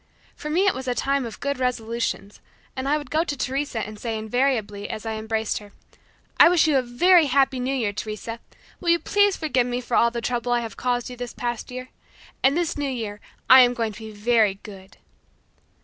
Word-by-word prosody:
For 300 - -7
me 355 +6 +2
it 395 - +4
was 260 0 -7
a 250 - 0
time 275 -1 0
of 225 - -10
good 280 -1 -2
resolutions, 230 -4 -2 0.4
and 265 +1 -3
I 300 - +3
would 295 - -9
go 315 +2 +2
to 290 -4 -4
Teresa 265 -3 -2
and 215 0 -9
say 225 -1 -3
invariably 220 -3 -1
as 215 - -6
I 225 - -2
embraced 220 0 -2
her, 205 -1 -15 0.7
"I - - +9
wish 350 -2 +4
you 305 - +2
a - - +1
very 315 +7 +4
happy 270 -1 +2
New 260 +2 -1
Year, 220 -6 -1
Teresa. 215 +2 -6 0.4
Will 345 - -2
you 340 - +5
please 405 +2 +2
forgive 260 -6 +1
me 245 0 -2
for 245 -1 -3
all 235 - +5
the 235 0 -4
trouble 245 +1 -1
I 240 - +2
have 225 -1 -7
caused 245 0 -2
you - - -7
this 245 -1 -6
past 240 -1 -4
year? 255 0 -7 0.5
And 275 +4 +3
this 340 -3 -1
new 285 -1 -1
year, 220 -5 -4 0.3
I 260 - +9
am 245 0 +4
going 230 -3 -1
to - - -11
be 220 -1 -8
very 215 -1 +2
good." 195 -2 -12
245 Hz, 220 wpm, -24 LUFS, 220-275 Hz, 0.7 s, I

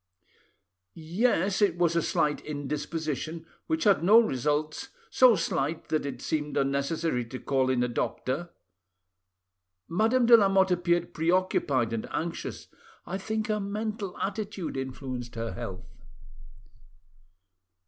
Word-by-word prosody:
"Yes, 190 +3 0
it 190 -5 +3
was 170 -1 +2
a 170 - +3
slight 150 -1 0
indisposition, 150 +2 -4 0.2
which 320 0 0
had 200 -5 +4
no 210 +6 +8
results, 150 - -1 0.2
so 255 -3 +6
slight 160 -3 -2
that 155 -2 0
it 140 - -6
seemed 150 -1 -2
unnecessary 140 0 0
to 130 +3 -7
call 135 -2 +1
in 125 -2 +2
a - - +1
doctor. 130 +6 -2 1.4
Madame 225 +8 +2
de 235 0 +9
Lamotte 195 -3 +4
appeared 175 -1 +1
preoccupied 160 -8 +1
and 115 - -3
anxious. 170 +1 -4 0.4
I 190 +2 -4
think 220 +2 -2
her 215 -1 -1
mental 205 -1 -4
attitude 200 -5 -4
influenced 130 -2 -5
her 115 -2 -4
health." 95 0 -7
165 Hz, 120 wpm, -28 LUFS, 140-195 Hz, 1.4 s, de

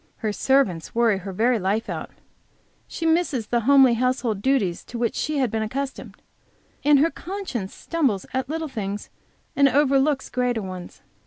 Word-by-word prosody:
Her 215 -2 -3
servants 220 -11 +1
worry 230 -4 +3
her 195 +1 -7
very 230 +5 +2
life 200 +4 -1
out; - - -5 0.8
she 330 - -5
misses 320 -8 +1
the 240 +2 0
homely 270 -3 +7
household 240 -3 0
duties 210 -9 +1
to 240 - -7
which 235 -1 0
she 305 -1 -2
has 255 -5 +1
been 220 -1 -1
accustomed; 265 +5 -5 0.6
and 295 0 +6
her 320 +4 +3
conscience 345 - -5
stumbles 270 - -1
at 260 0 -2
little 320 +1 -2
things, 205 -6 -5 0.4
and 280 -1 +5
overlooks 275 0 +2
greater 245 -3 0
ones. 185 -2 -8
250 Hz, 160 wpm, -23 LUFS, 215-280 Hz, 0.8 s, homely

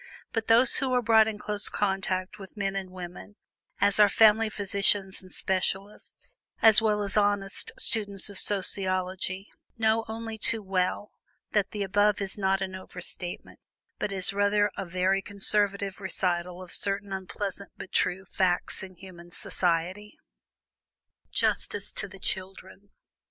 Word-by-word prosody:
But 225 -1 -2
those 235 +2 +5
who 265 -1 -1
are 250 - +3
brought 220 -1 +5
in 220 -1 -3
close 210 0 +2
contact 195 0 -2
with 195 +2 -12
men 195 -1 -2
and 190 -1 -4
women, 180 +2 -10 0.4
as 200 +1 +2
are 210 -1 +7
family 220 +1 +5
physicians 200 -1 0
and 185 -1 -16
specialists, 190 +2 -3 0.2
as 220 -1 +7
well 210 -2 +1
as 200 -1 +2
honest 205 - +1
students 205 - +3
of 200 -2 -4
sociology, 185 -1 -1 0.3
know 220 0 +2
only 225 0 -6
too 220 0 +4
well 190 +2 -1 0.4
that 205 -2 +1
the 205 -1 -3
above 205 +1 +2
is 195 -2 -3
not 195 -1 0
an 190 -1 -3
over 185 -1 -9
statement, 175 0 -6 0.4
but 205 - -2
is 190 0 -1
rather 205 +1 +2
a 195 - -5
very 185 +2 +1
conservative 200 0 0
recital 180 -1 -2
of 180 - -11
certain 200 0 +1
unpleasant, 195 +1 -4
but 190 - -9
true, 190 +2 0
facts 180 0 0
of 185 -2 -10
human 175 -2 -13
society. 180 +4 -2 1.1
JUSTICE 205 0 +1
TO - - -1
THE 195 0 -13
CHILDREN. 190 +1 -4
195 Hz, 145 wpm, -27 LUFS, 185-210 Hz, 1.1 s, are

